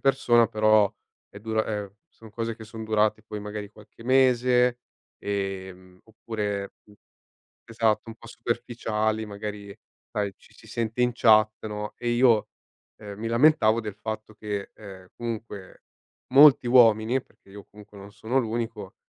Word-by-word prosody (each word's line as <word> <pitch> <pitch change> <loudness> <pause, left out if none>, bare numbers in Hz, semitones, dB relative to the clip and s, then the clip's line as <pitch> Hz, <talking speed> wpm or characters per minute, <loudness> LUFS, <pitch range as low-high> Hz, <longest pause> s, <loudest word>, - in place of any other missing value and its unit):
persona, 120 -4 +3
però 110 -1 +3 0.4
è 100 - -12
dura 110 0 -1
ehm, 105 -2 -5
son 110 -1 -16
cose 115 +1 -4
che 110 - -11
son 110 0 -9
durate 110 0 +1
poi 105 -1 -7
magari 105 0 -7
qualche 105 +2 -17
mese, 125 -1 +3 0.4
ehm, 95 -2 -5
oppure 105 -3 -5
mh. 105 - -20 0.8
Esatto 115 0 0
un 115 - -9
po' 115 - -15
superficiali, 110 -2 -2
magari 100 -1 -7 0.4
sai 100 -2 -2
ci - - -22
si - - -18
sente 115 +1 -3
in 125 - +2
chat, 110 -2 +3
no, 105 0 -5
e 120 - -3
io, 120 -3 +3 0.5
ehm, 100 -1 -9
mi 115 - -3
lamentavo 115 -2 +4
del 105 -2 -6
fatto 110 0 -7
che, 105 -2 -5
ehm, 95 -3 -12
comunque 110 -4 -7 0.5
molti 140 -2 +7
uomini, 120 0 +4
perché - - -27
io 100 0 -11
comunque 105 0 -15
non 100 +1 -11
sono 110 +5 -1
l'unico, 115 -4 -4
110 Hz, 150 wpm, -25 LUFS, 105-115 Hz, 0.8 s, molti